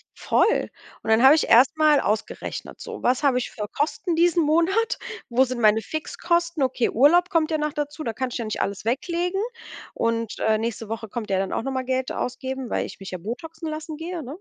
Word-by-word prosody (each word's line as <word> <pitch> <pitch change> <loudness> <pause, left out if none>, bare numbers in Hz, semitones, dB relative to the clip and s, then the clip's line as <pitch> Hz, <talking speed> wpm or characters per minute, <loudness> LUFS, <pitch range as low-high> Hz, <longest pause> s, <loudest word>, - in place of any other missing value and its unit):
Voll. 455 - +2 0.3
Und - - -5
dann 220 +3 +4
habe 270 +3 +9
ich 315 - +1
erst 255 +6 +6
mal 305 -2 +5
ausgerechnet: 215 -3 -3
„So, - - -8
was 250 +1 +2
habe 265 -3 +3
ich 250 - -2
für 210 -2 -5
Kosten 330 - -1
diesen 340 0 +3
Monat? 340 +9 +2 0.3
Wo 250 +2 +4
sind 255 -1 -4
meine 215 0 +5
Fixkosten?“ 340 - -1
Okay, 255 -2 +1
Urlaub 340 +9 +4
kommt 330 -4 +1
ja 310 - +1
noch 300 -1 -1
dazu, 295 +1 -4
da 230 - -2
kann 260 +3 -2
ich - - -3
ja 230 - -3
nicht 215 - -3
alles 200 +1 -3
weglegen. 345 - -1 0.5
Und, 230 -1 -1
äh, 220 0 +2
nächste 225 -1 -4
Woche 225 -1 -5
kommt 220 0 -5
ja 195 - +1
dann 190 -1 -2
auch - - 0
noch 270 - -3
mal 260 -1 -2
Geld 260 0 -1
ausgeben, 260 0 -4
weil - - 0
ich - - -12
mich 195 - -8
ja 185 - -5
botoxen 310 - -6
lassen 310 0 -6
gehe, 335 +1 -5
ne? 270 +4 -7
265 Hz, 220 wpm, -24 LUFS, 230-320 Hz, 0.5 s, habe